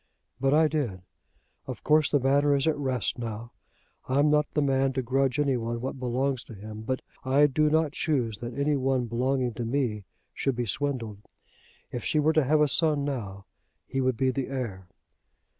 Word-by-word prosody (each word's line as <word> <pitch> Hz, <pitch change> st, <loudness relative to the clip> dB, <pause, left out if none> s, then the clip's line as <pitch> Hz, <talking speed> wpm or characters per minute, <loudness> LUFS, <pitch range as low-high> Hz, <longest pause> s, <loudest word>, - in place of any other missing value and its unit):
"But 135 Hz, +1 st, +2 dB
I 155 Hz, 0 st, +5 dB
did. 130 Hz, -, -2 dB, 0.6 s
Of -, -, -7 dB
course 155 Hz, -1 st, +4 dB
the 145 Hz, -, +3 dB
matter 140 Hz, +2 st, +3 dB
is 140 Hz, -, +1 dB
at 160 Hz, -, +3 dB
rest 130 Hz, -4 st, -1 dB
now. 115 Hz, 0 st, -5 dB, 0.6 s
I'm 145 Hz, +3 st, +3 dB
not 150 Hz, 0 st, +2 dB
the 150 Hz, -, +3 dB
man 135 Hz, -1 st, +2 dB
to 130 Hz, 0 st, -1 dB
grudge 135 Hz, +2 st, +1 dB
any 140 Hz, -3 st, +2 dB
one 115 Hz, 0 st, -3 dB
what 130 Hz, +2 st, -5 dB
belongs 130 Hz, +1 st, -1 dB
to 115 Hz, -, -11 dB
him; 105 Hz, +2 st, -8 dB
but 130 Hz, +3 st, -3 dB, 0.2 s
I 135 Hz, +3 st, +4 dB
do 150 Hz, +2 st, +2 dB
not 155 Hz, -1 st, +2 dB
choose 125 Hz, -10 st, -1 dB
that 120 Hz, +1 st, -6 dB
any 145 Hz, +1 st, +2 dB
one 130 Hz, -2 st, +1 dB
belonging 125 Hz, +1 st, 0 dB
to 120 Hz, -, -4 dB
me 115 Hz, -4 st, -1 dB, 0.3 s
should 135 Hz, -2 st, -1 dB
be 120 Hz, 0 st, -1 dB
swindled. 115 Hz, -3 st, -2 dB, 0.7 s
If 120 Hz, -, -4 dB
she -, -, 0 dB
were 155 Hz, +1 st, +3 dB
to 155 Hz, -1 st, +4 dB
have 150 Hz, +3 st, +3 dB
a 150 Hz, -, +5 dB
son 150 Hz, -1 st, +2 dB
now, 100 Hz, -8 st, -5 dB, 0.4 s
he 135 Hz, +1 st, -2 dB
would 130 Hz, -2 st, +1 dB
be 130 Hz, -1 st, +2 dB
the 135 Hz, 0 st, -3 dB
heir." 115 Hz, -9 st, -5 dB
130 Hz, 190 wpm, -27 LUFS, 120-145 Hz, 0.7 s, I